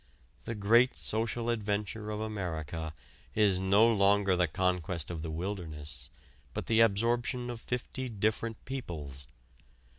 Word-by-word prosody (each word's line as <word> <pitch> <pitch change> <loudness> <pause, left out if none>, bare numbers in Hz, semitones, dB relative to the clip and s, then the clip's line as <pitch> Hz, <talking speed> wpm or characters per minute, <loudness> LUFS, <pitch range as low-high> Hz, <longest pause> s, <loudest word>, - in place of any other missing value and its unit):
The 115 - -3
great 115 +5 +4
social 115 +2 -1
adventure 105 -1 -2
of 105 0 -3
America 80 -7 -3 0.4
is 100 -4 +4
no 100 +4 +5
longer 100 -3 +4
the 90 -1 +3
conquest 90 -2 0
of 80 -2 -4
the 80 - -4
wilderness 80 -7 -4 0.5
but - - -3
the 115 0 +3
absorption 120 +3 +2
of 115 -2 -7
fifty 125 +1 -3
different 110 +1 -1
peoples. 75 - -6
100 Hz, 125 wpm, -31 LUFS, 85-115 Hz, 0.5 s, no